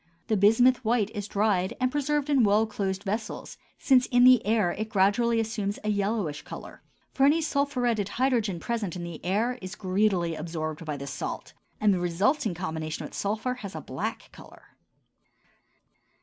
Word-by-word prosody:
The 220 - +3
bismuth 240 +6 +4
white 220 -2 +1
is 205 -2 -5
dried 205 -1 0
and 255 0 +1
preserved 295 0 0
in 280 -4 +3
well 210 +1 +4
closed 195 -2 -3
vessels, 215 +2 -4 0.2
since 255 -2 +3
in 245 0 +4
the 255 -2 +7
air 215 -5 +2
it 215 +4 -4
gradually 220 +4 +2
assumes 215 -2 -2
a 215 - -1
yellowish 200 -7 -1
color; - - -10 0.3
for 270 - +1
any 290 +4 +5
sulphuretted 255 -9 0
hydrogen 230 -7 0
present 210 -2 -3
in 175 - -5
the 170 -2 -8
air 225 +8 0
is 185 +2 -7
greedily 185 -3 +1
absorbed 155 0 -5
by 150 -2 -3
this 140 0 -6
salt, - - -5 0.3
and 210 -1 +4
the 185 - 0
resulting 185 - 0
combination 160 -3 -4
with - - -10
sulphur 215 +5 -2
has 200 -1 -7
a - - -4
black - - -5
color. - - -16
210 Hz, 165 wpm, -27 LUFS, 185-240 Hz, 0.3 s, the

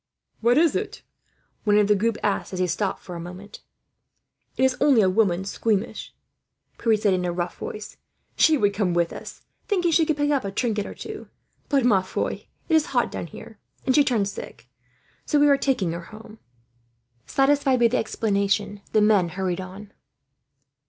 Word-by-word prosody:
"What 235 +3 +3
is 325 0 +4
it?" - - -4 0.6
one 210 -1 +3
of 210 - +5
the 210 - +5
group 225 +3 0
asked, 200 -1 -1
as - - -3
he 185 - +2
stopped 190 +3 -2
for 180 - -8
a - - -6
moment. 180 +5 -10 1.0
"It - - +1
is 260 -1 +3
only 275 -6 +5
a 190 - +4
woman, 190 -3 +1
squeamish," 210 +1 -2 0.6
Pierre 225 -2 +3
said 205 -2 +2
in 180 -1 0
a 175 - -1
rough 175 0 -3
voice. 210 0 -7 0.4
"She 315 -2 +4
would 205 -5 +2
come 195 -4 0
with 170 -1 +1
us, - - -10 0.2
thinking 360 -6 +1
she 320 0 +3
could 310 - 0
pick 290 0 +1
up 280 -5 +1
a 200 - -3
trinket 210 0 -1
or - - -8
two; - - -8 0.4
but, 275 -4 +2
ma 205 -6 +4
foi, 185 - -4 0.2
it 330 - -1
is 315 0 +4
hot - - +2
down - - -5
there, - - -12 0.3
and 260 - +2
she 290 - +5
turned 230 -8 +1
sick. 200 - -9 0.6
So 295 - +2
we 290 - +5
are 285 - +6
taking 255 -11 0
her 170 0 -6
home." 220 +1 -13 0.9
Satisfied 275 -1 +2
with 235 -1 +4
the - - +2
explanation, 200 -2 -1
the 215 - +4
men 205 -5 +4
hurried 185 0 -2
on. 195 +2 -10
210 Hz, 190 wpm, -24 LUFS, 190-260 Hz, 1.0 s, are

